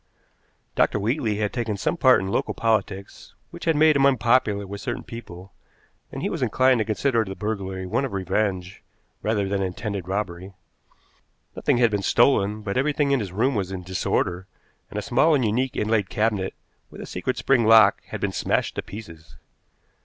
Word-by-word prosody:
Dr. - - +2
Wheatley 115 +1 0
had 105 -1 -1
taken 115 -4 -2
some 135 - -1
part 130 -6 +5
in 95 - -4
local - - -1
politics 100 -3 -2 0.2
which - - -9
had 165 -2 +2
made 155 0 +5
him 140 0 +5
unpopular 115 -5 +2
with 100 +1 -7
certain 120 -3 -4
people, 95 -5 -10 0.6
and - - -6
he - - 0
was - - -4
inclined 130 -1 +3
to 110 - 0
consider 115 +2 +1
the 95 -2 -7
burglary 95 -3 -4
one 90 +9 -1
of 135 - -3
revenge 95 0 -2 0.4
rather 105 -2 0
than 100 0 -1
intended 95 0 -4
robbery. 95 -1 -4 1.0
Nothing - - +1
had 120 -2 +3
been 105 -1 -1
stolen, 105 -2 +2
but 100 +1 -3
everything 145 +1 +1
in 140 - +3
his 100 -5 -4
room 120 +9 +1
was 95 -5 -2
in 95 -1 -5
disorder, 90 0 -1 0.4
and - - -7
a 105 - -2
small 140 +5 +3
and 130 -4 +1
unique 125 +5 0
inlaid 105 -2 0
cabinet 105 -3 -1 0.3
with - - -12
a - - -6
secret - - -3
spring 130 -4 +2
lock 110 -3 +6
had - - -7
been - - -1
smashed - - -1
to - - 0
pieces. 80 -7 -11
105 Hz, 185 wpm, -24 LUFS, 95-120 Hz, 1.0 s, lock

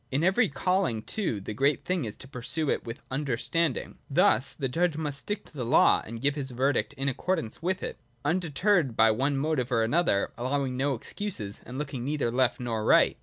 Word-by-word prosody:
In 140 +4 +1
every 195 +5 +3
calling, 180 - 0
too, 180 - -2
the 100 +2 -6
great 140 +5 +1
thing 180 -7 0
is 105 - -6
to - - -11
pursue 130 +4 0
it - - -1
with 115 0 -7
understanding. 140 +3 -1
Thus 120 +5 +3
the 135 - -2
judge 165 +4 0
must 145 -3 -3
stick 205 +7 -4
to - - -16
the 135 -4 -4
law, 120 +7 +5
and 115 +1 -7
give 140 +3 +2
his 140 -2 -4
verdict 125 -3 0
in 135 +1 -3
accordance 150 -2 -2
with 185 +2 -1
it, - - -5 0.3
undeterred 170 - +1
by 110 0 +6
one 135 +6 0
motive 135 -4 0
or 115 -2 +3
another, 120 - +2
allowing 130 +1 -1
no 135 +1 +1
excuses, 120 - -5
and 125 +2 -6
looking 135 -4 -4
neither 140 -3 -1
left 130 +1 +2
nor 115 -3 -2
right. - - +5
135 Hz, 200 wpm, -28 LUFS, 120-160 Hz, 0.3 s, by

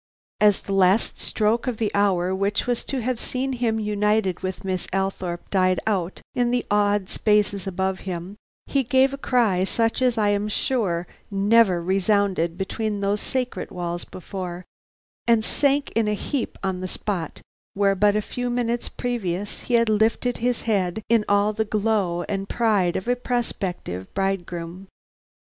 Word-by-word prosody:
As 210 -2 +4
the 195 - -4
last 195 +2 +3
stroke 220 +3 +1
of 245 -3 -1
the 215 -2 0
hour 190 -3 +2
which 200 +2 0
was 245 -1 -1
to 265 -4 -2
have 250 0 -1
seen 260 +1 -2
him 235 -3 0
united 210 -2 +1
with 185 -1 -4
Miss 185 -2 -2
Althorpe 190 -2 -2
died 185 -2 +3
out 190 -4 -1
in 245 -1 +1
the 245 0 0
awed 205 -1 +2
spaces 205 -2 +1
above 190 0 -1
him, 180 +1 -5 0.3
he 275 - +1
gave 265 +2 +3
a - - -4
cry 225 -10 +2
such 225 +5 0
as 250 -2 +2
I 210 -1 +3
am 205 0 +1
sure 205 -6 0 0.2
never 200 -2 +4
resounded 190 -2 +1
between 205 +2 -2
those 200 +1 0
sacred 255 -1 -3
walls 175 -1 -4
before, 180 -1 -7 0.6
and 230 -2 +4
sank 285 0 +1
in 225 -1 +1
a 210 - +1
heap 260 +5 -3
on 190 -1 -1
the 185 - -3
spot 185 -4 -4 0.3
where 200 0 +3
but 205 +1 +3
a 210 - +1
few 245 +3 -3
minutes 240 -1 -1
previous 205 -5 -3
he 245 - -1
had 230 0 +4
lifted 220 +3 +1
his 245 0 0
head 200 -2 0
in 230 -2 +4
all 205 +1 +3
the 220 +1 0
glow 205 -5 0
and 195 -1 -3
pride 205 -7 +2
of 190 - -3
a 245 - +3
prospective 195 - -3
bridegroom. 185 -1 -3
205 Hz, 165 wpm, -24 LUFS, 190-230 Hz, 0.6 s, As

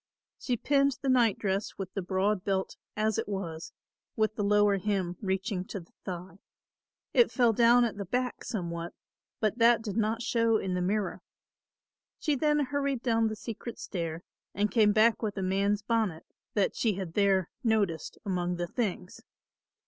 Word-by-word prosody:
She 245 -2 -1
pinned 275 +1 +2
the 270 - +1
nightdress 215 -5 +1
with 190 -1 -6
the 195 - -2
broad 190 +1 0
belt 190 -1 -1 0.2
as 215 0 +1
it - - -3
was, 170 -5 -4 0.4
with 215 0 +1
the 210 - -2
lower 205 -1 +4
hem 185 -3 -1
reaching 190 -1 -1
to 200 - -5
the 170 - -16
thigh. 180 0 -7 0.7
It 480 - +5
fell 240 -4 +3
down 240 +2 +5
at 220 -3 -3
the 200 - -4
back 250 +6 -2
somewhat, 170 -6 -4 0.4
but 215 +2 0
that 230 -1 +5
did 205 -4 -4
not 225 +2 0
show 230 -1 +2
in 190 -3 -2
the 180 - 0
mirror. 200 +2 -1 1.0
She 300 - 0
then 295 +1 +2
hurried 280 -2 -1
down 225 -2 +2
the 220 - -3
secret 230 +2 -7
stair 165 -2 -4 0.3
and 205 +1 +1
came 215 -3 +5
back 220 +2 +4
with 210 -3 -3
a 190 - -1
man's 200 +2 +1
bonnet 215 -8 0 0.3
that 200 -2 +1
she 220 -4 +1
had 185 -4 -5
there 195 -3 +2
noticed 205 -9 0
among 180 -2 -1
the 175 0 -2
things. 185 -2 -3
205 Hz, 170 wpm, -29 LUFS, 190-230 Hz, 1.0 s, It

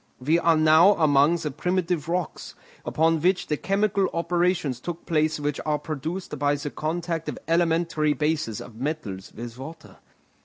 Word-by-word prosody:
We 155 +6 +2
are 165 -1 +3
now 160 +5 +6
among 145 0 +4
the 155 -3 -3
primitive 175 +1 -1
rocks, 175 -2 -3 0.3
upon 160 0 +1
which 180 +2 +2
the 150 - -1
chemical 195 +2 +1
operations 170 -5 0
took 170 +5 -6
place 155 -1 +1
which 145 0 -2
are 150 -1 0
produced 155 +1 -5
by 145 0 +2
the 145 0 -5
contact 165 +1 -3
of - - -5
elementary 165 -2 +2
bases 150 -8 -1
of 115 -2 -11
metals 120 -9 -4
with 120 +1 -9
water. 160 +4 -10
160 Hz, 155 wpm, -25 LUFS, 150-170 Hz, 0.3 s, now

